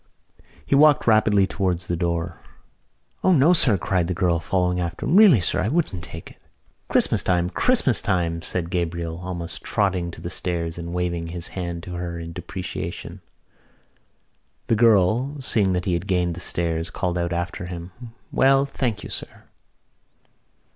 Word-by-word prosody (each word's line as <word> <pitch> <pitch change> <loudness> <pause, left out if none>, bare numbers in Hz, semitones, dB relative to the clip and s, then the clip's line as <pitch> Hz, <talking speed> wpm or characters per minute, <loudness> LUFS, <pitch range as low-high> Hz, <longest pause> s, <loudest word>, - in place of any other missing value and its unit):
He - - -1
walked 150 +1 +5
rapidly 110 -3 +4
towards 90 -2 -1
the 85 - -2
door. 85 -1 -2 0.8
"O 185 - +4
no, 160 +1 +5
sir!" 125 - +4
cried 90 -1 0
the 90 - -2
girl, 85 -1 +1
following 90 +1 0
him. 85 -1 -1 0.2
"Really, 200 - +7
sir, 85 - 0
I 95 - 0
wouldn't 120 - -1
take 85 -2 -9
it." - - -19 0.5
"Christmas - - +2
time! 90 -1 0
Christmas 225 - +3
time!" 85 -5 -1
said 85 0 -3
Gabriel, 85 -1 -3
almost 90 -1 -5
trotting 95 -5 0
to - - -10
the 85 - -6
stairs 85 -2 -2
and 85 0 -6
waving 85 -2 -2
his 85 0 -5
hand 85 -2 -5
to 90 - -7
her 85 -1 -4
in 85 0 -7
deprecation. - - -6 1.4
The 115 - +2
girl, 115 +6 +3
seeing 105 -7 +2
that 90 0 -2
he 90 - 0
had 85 +3 -2
gained 90 -3 +1
the 85 - -8
stairs, 85 -1 -1
called 90 +1 -2
out 85 0 -2
after 85 +1 -3
him: 90 0 -7 0.4
"Well, 135 +1 +4
thank 120 -6 -3
you, - - -8
sir." - - -6
90 Hz, 160 wpm, -23 LUFS, 85-105 Hz, 1.4 s, Really